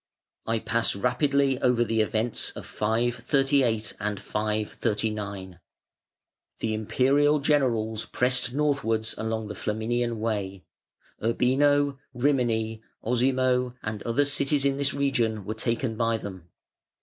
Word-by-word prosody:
I 115 Hz, 0 st, +1 dB
pass 115 Hz, 0 st, 0 dB
rapidly 135 Hz, +4 st, +1 dB
over 125 Hz, -2 st, +3 dB
the 110 Hz, -1 st, +1 dB
events 110 Hz, +2 st, -1 dB
of -, -, -8 dB
538 120 Hz, +1 st, +1 dB
and 105 Hz, -1 st, -2 dB
539. 105 Hz, -3 st, -2 dB, 1.0 s
The 110 Hz, -1 st, -2 dB
Imperial 135 Hz, +7 st, +3 dB
generals 120 Hz, -7 st, +1 dB
pressed 125 Hz, -1 st, +1 dB
northwards 140 Hz, -7 st, 0 dB
along 110 Hz, 0 st, -3 dB
the 105 Hz, -, -5 dB
Flaminian 115 Hz, +3 st, -1 dB
Way. 100 Hz, -4 st, -2 dB, 0.6 s
Urbino, 140 Hz, +4 st, +2 dB, 0.2 s
Rimini, 120 Hz, -4 st, +1 dB, 0.2 s
Osimo, 125 Hz, +1 st, +1 dB
and 105 Hz, -1 st, -4 dB
other 130 Hz, +5 st, +1 dB
cities 140 Hz, 0 st, +1 dB
in 140 Hz, 0 st, +2 dB
this 140 Hz, -1 st, 0 dB
region 115 Hz, -7 st, 0 dB
were 110 Hz, -, -3 dB
taken 115 Hz, +1 st, -1 dB
by 115 Hz, 0 st, +1 dB
them. 95 Hz, -5 st, -8 dB
115 Hz, 115 wpm, -26 LUFS, 110-135 Hz, 1.0 s, over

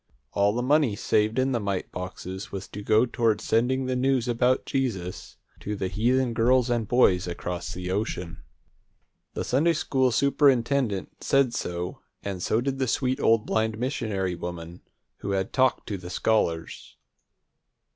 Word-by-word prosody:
All 100 Hz, +1 st, +2 dB
the 120 Hz, -, -1 dB
money 140 Hz, -4 st, +3 dB
saved 105 Hz, +2 st, +1 dB
in 130 Hz, +1 st, +2 dB
the 120 Hz, -, +1 dB
mite 100 Hz, -3 st, -3 dB
boxes 95 Hz, +1 st, -6 dB
was 95 Hz, -1 st, -6 dB
to 105 Hz, -, -7 dB
go 110 Hz, +3 st, +4 dB
toward 115 Hz, -3 st, +1 dB
sending 125 Hz, +5 st, +1 dB
the 130 Hz, 0 st, -1 dB
news 130 Hz, -1 st, +1 dB
about 125 Hz, +2 st, +2 dB
Jesus 110 Hz, -10 st, -3 dB, 0.2 s
to 105 Hz, -, -4 dB
the 95 Hz, -2 st, -2 dB
heathen 120 Hz, +5 st, +1 dB
girls 125 Hz, +2 st, +3 dB
and 115 Hz, -3 st, 0 dB
boys 95 Hz, -8 st, +3 dB
across 85 Hz, 0 st, -4 dB
the 90 Hz, 0 st, -5 dB
ocean. 95 Hz, -4 st, -3 dB, 0.9 s
The -, -, -2 dB
Sunday 155 Hz, +7 st, +2 dB
school 130 Hz, -4 st, +1 dB
superintendent 135 Hz, -4 st, +1 dB
said 135 Hz, -3 st, +3 dB
so, 90 Hz, -5 st, -4 dB, 0.2 s
and 95 Hz, -3 st, -4 dB
so 110 Hz, +6 st, +1 dB
did 135 Hz, +1 st, -2 dB
the 130 Hz, -, +1 dB
sweet 130 Hz, +2 st, 0 dB
old 115 Hz, -1 st, +3 dB
blind 110 Hz, 0 st, 0 dB
missionary 110 Hz, -7 st, -2 dB
woman, 85 Hz, 0 st, -7 dB, 0.4 s
who 100 Hz, -, -3 dB
had 95 Hz, 0 st, -2 dB
talked 130 Hz, -1 st, +2 dB
to 100 Hz, -3 st, -3 dB
the 90 Hz, 0 st, -9 dB
scholars. 85 Hz, -5 st, -1 dB
115 Hz, 155 wpm, -26 LUFS, 95-130 Hz, 0.9 s, go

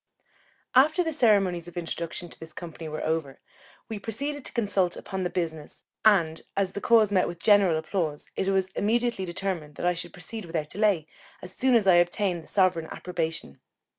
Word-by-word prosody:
After 310 Hz, +7 st, +5 dB
the 325 Hz, -1 st, -2 dB
ceremonies 195 Hz, -, +3 dB
of 175 Hz, -, -11 dB
introduction 170 Hz, 0 st, -4 dB
to -, -, -10 dB
this 160 Hz, -1 st, -10 dB
company 165 Hz, -2 st, -7 dB
were 155 Hz, -, -4 dB
over, 160 Hz, -4 st, -2 dB, 0.5 s
we 220 Hz, -2 st, -5 dB
proceeded 280 Hz, +7 st, -4 dB
to -, -, -6 dB
consult 200 Hz, -6 st, +1 dB
upon 190 Hz, 0 st, -5 dB
the 180 Hz, -, 0 dB
business; 160 Hz, -4 st, -4 dB, 0.2 s
and 170 Hz, -7 st, +4 dB, 0.2 s
as 195 Hz, -1 st, +1 dB
the 200 Hz, -, -5 dB
cause 220 Hz, -3 st, +5 dB
met 185 Hz, -2 st, +3 dB
with 170 Hz, -1 st, -7 dB
general 200 Hz, -6 st, +5 dB
applause, 160 Hz, -3 st, -2 dB
it 190 Hz, -, -1 dB
was 190 Hz, -1 st, +1 dB
immediately 230 Hz, 0 st, 0 dB
determined 170 Hz, -4 st, -4 dB
that -, -, -4 dB
I 180 Hz, -, +3 dB
should 175 Hz, 0 st, -6 dB
proceed 205 Hz, +4 st, -7 dB
without 160 Hz, -3 st, -3 dB
delay, 200 Hz, -6 st, +2 dB, 0.4 s
as 185 Hz, -, -8 dB
soon 255 Hz, -1 st, +3 dB
as 225 Hz, -4 st, +4 dB
I 185 Hz, -2 st, +6 dB
obtained 175 Hz, 0 st, +1 dB
the -, -, -17 dB
sovereign 185 Hz, -4 st, +2 dB
approbation. 165 Hz, -, -4 dB
185 Hz, 185 wpm, -27 LUFS, 165-205 Hz, 0.5 s, I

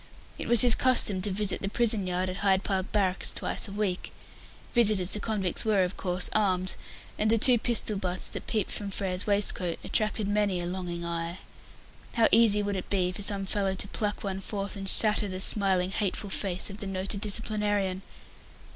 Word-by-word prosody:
It -, -, -5 dB
was 235 Hz, -1 st, +6 dB
his 245 Hz, -2 st, +7 dB
custom 230 Hz, -7 st, +3 dB
to 205 Hz, -, -1 dB
visit 200 Hz, +1 st, -2 dB
the 195 Hz, -, -2 dB
prison 215 Hz, -3 st, 0 dB
yard 180 Hz, +1 st, -1 dB
at 185 Hz, 0 st, -4 dB
Hyde 195 Hz, -1 st, +2 dB
Park 190 Hz, -2 st, -2 dB
Barracks 195 Hz, -3 st, +1 dB
twice -, -, -1 dB
a -, -, -9 dB
week. 200 Hz, -3 st, -2 dB, 0.6 s
Visitors 210 Hz, -6 st, +4 dB
to 210 Hz, -, +5 dB
convicts 205 Hz, -5 st, -2 dB
were, 210 Hz, -4 st, +2 dB
of 180 Hz, +1 st, -3 dB
course, 180 Hz, 0 st, -2 dB
armed, 185 Hz, -3 st, 0 dB, 0.4 s
and 215 Hz, -, +1 dB
the 230 Hz, -, +3 dB
two 245 Hz, +2 st, +6 dB
pistol 225 Hz, -3 st, 0 dB
butts 185 Hz, -1 st, -2 dB
that -, -, -8 dB
peeped 215 Hz, -4 st, -1 dB
from 205 Hz, -, -4 dB
Frere's 190 Hz, -1 st, -2 dB
waistcoat 200 Hz, -4 st, +1 dB
attracted 215 Hz, -1 st, -1 dB
many 205 Hz, -3 st, 0 dB
a 175 Hz, -, -3 dB
longing 175 Hz, -1 st, -4 dB
eye. 170 Hz, +1 st, -4 dB, 0.8 s
How 230 Hz, -2 st, +4 dB
easy 220 Hz, -2 st, +5 dB
would 200 Hz, 0 st, -2 dB
it 185 Hz, -, -5 dB
be 185 Hz, -2 st, 0 dB
for 185 Hz, -, -7 dB
some 200 Hz, -1 st, -1 dB
fellow 195 Hz, -1 st, -1 dB
to 200 Hz, -, -4 dB
pluck 210 Hz, -2 st, -3 dB
one 195 Hz, -1 st, -4 dB
forth 200 Hz, 0 st, -5 dB
and 195 Hz, -1 st, -4 dB
shatter 210 Hz, 0 st, +2 dB
the 185 Hz, -1 st, -5 dB
smiling, 190 Hz, -2 st, +1 dB
hateful 200 Hz, 0 st, -2 dB
face 190 Hz, 0 st, -2 dB
of 200 Hz, -, -9 dB
the 205 Hz, -, -5 dB
noted 195 Hz, +1 st, -4 dB
disciplinarian! 205 Hz, -3 st, -1 dB
200 Hz, 190 wpm, -28 LUFS, 185-210 Hz, 0.8 s, his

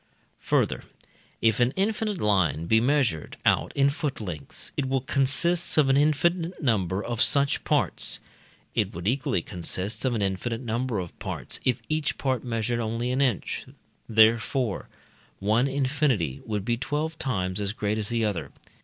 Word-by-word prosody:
Further, -, -, +1 dB, 0.6 s
if 115 Hz, -1 st, +3 dB
an 120 Hz, +2 st, +3 dB
infinite 210 Hz, +1 st, 0 dB
line 90 Hz, -, +2 dB
be 110 Hz, +5 st, +4 dB
measured 125 Hz, -, +1 dB
out -, -, +3 dB
in 140 Hz, 0 st, +4 dB
foot 145 Hz, -1 st, -3 dB
lengths, 90 Hz, -9 st, -5 dB
it 135 Hz, -, -1 dB
will 135 Hz, -1 st, +1 dB
consist 145 Hz, +7 st, +1 dB
of 145 Hz, -3 st, +5 dB
an 135 Hz, -, +4 dB
infinite 165 Hz, +5 st, +2 dB
number 100 Hz, -, 0 dB
of 120 Hz, 0 st, -2 dB
such 140 Hz, -1 st, +3 dB
parts; -, -, +1 dB, 0.5 s
it -, -, 0 dB
would 85 Hz, +3 st, -4 dB
equally 120 Hz, -8 st, 0 dB
consist 95 Hz, +4 st, -3 dB
of 130 Hz, -3 st, +1 dB
an 105 Hz, -, 0 dB
infinite 100 Hz, +5 st, -2 dB
number 120 Hz, -1 st, -2 dB
of 90 Hz, -3 st, -6 dB
parts, -, -, -4 dB
if 125 Hz, -2 st, +1 dB
each 155 Hz, -2 st, -1 dB
part 130 Hz, -4 st, -1 dB
measured 120 Hz, 0 st, -1 dB
only 115 Hz, +2 st, -1 dB
an 130 Hz, +2 st, +1 dB
inch: 125 Hz, -8 st, -1 dB, 0.4 s
therefore, 110 Hz, +1 st, +3 dB, 0.5 s
one 110 Hz, +6 st, +2 dB
infinity 135 Hz, -, 0 dB
would 105 Hz, -3 st, -2 dB
be 120 Hz, 0 st, +1 dB
twelve 155 Hz, +5 st, -2 dB
times 100 Hz, -9 st, -1 dB
as 100 Hz, 0 st, -1 dB
great 105 Hz, 0 st, -1 dB
as 105 Hz, -, -2 dB
the 115 Hz, -1 st, +1 dB
other. 85 Hz, -9 st, -2 dB
120 Hz, 160 wpm, -26 LUFS, 105-140 Hz, 0.6 s, of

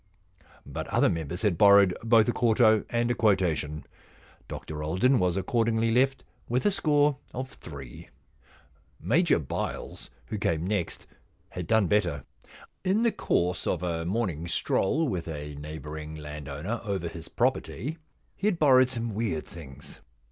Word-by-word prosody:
But -, -, -5 dB
other -, -, +3 dB
members 85 Hz, +3 st, -4 dB
had 100 Hz, -6 st, +1 dB
borrowed 100 Hz, -2 st, +7 dB
both 115 Hz, -1 st, +5 dB
a -, -, +3 dB
quarto 110 Hz, -3 st, +4 dB
and 120 Hz, 0 st, +1 dB
a -, -, +3 dB
quotation. 85 Hz, -9 st, +1 dB, 0.6 s
Dr 75 Hz, -1 st, -6 dB
Alden 95 Hz, -, +2 dB
was 90 Hz, 0 st, +1 dB
accordingly 115 Hz, +3 st, +1 dB
left 135 Hz, +3 st, +2 dB, 0.3 s
with 125 Hz, +2 st, 0 dB
a 205 Hz, -, +5 dB
score 150 Hz, -7 st, +2 dB, 0.2 s
of 130 Hz, +1 st, -4 dB
three. 70 Hz, -6 st, -10 dB, 0.9 s
Major 170 Hz, +7 st, +3 dB
Byles, 75 Hz, -, -5 dB, 0.2 s
who 105 Hz, -, -5 dB
came 80 Hz, -4 st, 0 dB
next, 100 Hz, -3 st, -2 dB, 0.4 s
had 90 Hz, -2 st, -6 dB
done 110 Hz, -1 st, +3 dB
better. 85 Hz, -8 st, +1 dB, 0.6 s
In 195 Hz, +4 st, +2 dB
the 235 Hz, -, +3 dB
course 90 Hz, -, 0 dB
of -, -, -1 dB
a 85 Hz, -2 st, -2 dB
morning 90 Hz, -4 st, -2 dB
stroll 145 Hz, -, +1 dB
with 90 Hz, -9 st, -3 dB
a 75 Hz, -2 st, -6 dB
neighbouring 75 Hz, +1 st, -7 dB
landowner 75 Hz, +7 st, -5 dB
over 100 Hz, -5 st, -2 dB
his 85 Hz, -1 st, -9 dB
pro -, -, +3 dB
perty, 150 Hz, +9 st, -6 dB, 0.4 s
he 200 Hz, -, -1 dB
had 200 Hz, -5 st, +1 dB
borrowed 130 Hz, -5 st, +5 dB
some 115 Hz, -3 st, -3 dB
weird 100 Hz, -8 st, -2 dB
things. 70 Hz, -6 st, -11 dB
100 Hz, 150 wpm, -27 LUFS, 80-120 Hz, 0.9 s, borrowed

